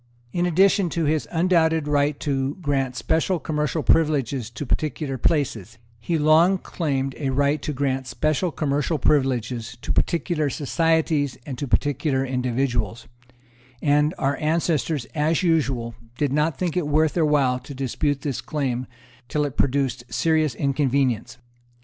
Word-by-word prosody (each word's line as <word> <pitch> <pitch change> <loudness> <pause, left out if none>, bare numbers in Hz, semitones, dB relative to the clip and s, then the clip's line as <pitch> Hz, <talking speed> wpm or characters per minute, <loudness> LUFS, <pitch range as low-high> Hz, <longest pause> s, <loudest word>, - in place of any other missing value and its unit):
In 175 0 +1
addition 190 +2 +3
to 165 - +1
his 155 0 0
undoubted 165 -3 +2
right 145 0 +1
to 135 -1 -1
grant 135 -6 -1
special 165 +7 0
commercial 150 0 -2
privileges 140 -7 +1
to 120 +5 -6
particular 145 0 -2
places, 115 - -1 0.2
he 165 +8 -1
long 160 +5 +5
claimed 135 -7 -2
a 140 -3 -1
right 140 +2 +1
to 150 - -3
grant 135 -2 -1
special 155 +7 0
commercial 145 +2 -1
privileges 125 -5 0
to - - -1
particular 165 -3 0
societies 155 -2 0
and 135 - -5
to 145 - -3
particular 135 +1 +1
individuals; 125 -3 -1 0.7
and 150 +2 +2
our 140 +1 0
ancestors, 155 -3 0
as 155 +3 +1
usual, 135 -9 +1 0.2
did 145 -2 0
not 150 0 +1
think 180 -3 -2
it 175 -5 0
worth 155 +1 +2
their 170 - +1
while 140 -4 +2
to 135 +2 -10
dispute 135 +2 -1
this 140 -4 -3
claim, 130 -2 -2 0.4
till 150 +2 0
it 140 -2 -5
produced 135 -2 0
serious 160 -3 +1
inconvenience. 135 -4 0
145 Hz, 145 wpm, -23 LUFS, 130-155 Hz, 0.7 s, long